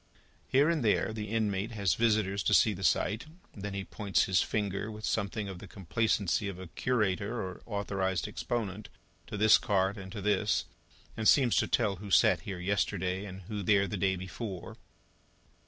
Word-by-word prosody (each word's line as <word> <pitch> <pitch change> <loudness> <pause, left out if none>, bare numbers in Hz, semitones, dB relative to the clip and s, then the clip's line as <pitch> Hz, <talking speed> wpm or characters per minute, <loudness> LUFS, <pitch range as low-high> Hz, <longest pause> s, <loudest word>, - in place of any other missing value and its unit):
Here 140 +3 +4
and 165 -5 +1
there, 110 0 +2
the 105 -1 -5
inmate 110 0 -1
has 100 -5 +1
visitors 105 -4 +1
to - - +4
see 110 - +5
the 95 0 -7
sight; 105 - +1 0.3
then 100 -1 -6
he 100 - -3
points 100 -4 0
his 95 -2 +2
finger, 105 0 -2
with 110 0 -6
something 105 0 -1
of 95 -2 -7
the 100 - -10
complacency 100 -1 0
of 100 -2 -5
a 95 - -8
curator 105 +2 -1
or 95 -1 -5
authorised 95 -4 -1
exponent, 105 -4 -4 0.4
to - - -5
this 110 +1 +6
cart 95 +1 +1
and 95 -1 -9
to 105 - -6
this, 105 +1 +1 0.5
and 110 - 0
seems 130 -5 +5
to - - +2
tell 105 -5 +1
who 100 +2 -9
sat - - +5
here 95 -3 -6
yesterday, 95 0 -1
and 95 -1 -9
who 105 +2 -5
there 100 +1 +3
the 95 - -4
day 95 0 +1
before. 95 +1 -6
100 Hz, 180 wpm, -30 LUFS, 95-110 Hz, 0.5 s, this